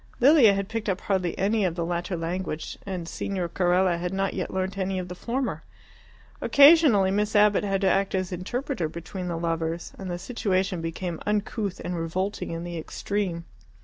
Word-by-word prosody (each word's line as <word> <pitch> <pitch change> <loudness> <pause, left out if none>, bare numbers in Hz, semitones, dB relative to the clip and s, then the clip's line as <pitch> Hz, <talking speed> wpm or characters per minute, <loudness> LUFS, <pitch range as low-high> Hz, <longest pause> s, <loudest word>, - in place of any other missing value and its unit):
Lilia 255 -6 +7
had 195 0 -2
picked 225 -1 -3
up 190 -1 -1
hardly 185 -4 -1
any 210 +2 +1
of 175 -3 0
the 170 -1 -2
latter 175 +1 -2
language, 165 -1 -4
and 180 -4 -4
Signor 185 0 -3
Carella 180 0 +2
had 180 +1 -2
not 195 0 -1
yet - - -3
learnt 190 +1 -2
any 190 -1 -1
of 180 -1 -4
the - - -5
former. 245 +8 -3 0.8
Occasionally 280 - +6
Miss 210 +2 0
Abbott 210 -1 +5
had 195 -1 0
to 195 - +3
act 195 +1 +2
as 185 -1 -1
interpreter 195 - -3
between 180 +3 -6
the 170 -1 -2
lovers, 165 0 -2
and 190 -1 -5
the 175 - -2
situation 190 -4 -1
became 165 +1 -4
uncouth 210 -1 -1
and 180 - -3
revolting 180 +5 -2
in 165 0 -4
the 175 -1 -5
extreme. 180 0 -3
190 Hz, 180 wpm, -26 LUFS, 175-205 Hz, 0.8 s, Lilia